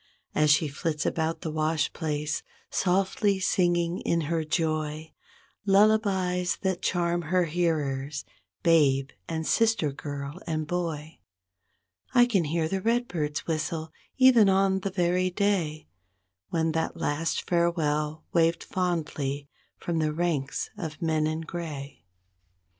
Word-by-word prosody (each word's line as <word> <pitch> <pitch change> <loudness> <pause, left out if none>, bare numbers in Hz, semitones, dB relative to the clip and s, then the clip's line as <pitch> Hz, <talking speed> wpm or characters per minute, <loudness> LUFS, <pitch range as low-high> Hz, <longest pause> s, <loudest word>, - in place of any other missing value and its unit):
As 150 0 +3
she 150 +2 +4
flits 150 +2 -2
about 160 0 -1
the 160 - -3
wash 155 -1 0
place, 150 -1 -2 0.3
softly 195 +2 +1
singing 175 -2 +1
in 170 - 0
her 160 +1 -1
joy 155 -1 -2 0.5
Lullabies 195 -3 +3
that 190 -2 0
charm 175 -1 +1
her 180 +3 +1
hearers, 150 -4 -1 0.4
babe 140 -5 +4 0.2
and 160 -1 -2
sister 225 -10 +2
girl 145 +3 -6
and 155 -1 -1
boy. 160 -2 -3 1.0
I 245 -1 +8
can 200 -9 +1
hear 160 +1 0
a 195 -1 -1
redbird's 180 -10 -1
whistle, 160 0 -2 0.2
even 250 -6 +7
on 190 0 +3
the 195 - -2
very 180 0 +1
day 180 -6 0 0.6
When 160 -1 +1
that 160 +1 -2
last 155 +3 -1
farewell 155 -3 0
waved 165 0 +3
fondly 150 -6 -2 0.3
from 170 -2 -2
the 155 -1 +1
ranks 155 -5 -1
of 155 -4 -5
men 155 -2 +1
in 155 +1 -2
gray. 155 - -7
165 Hz, 125 wpm, -27 LUFS, 155-180 Hz, 1.0 s, I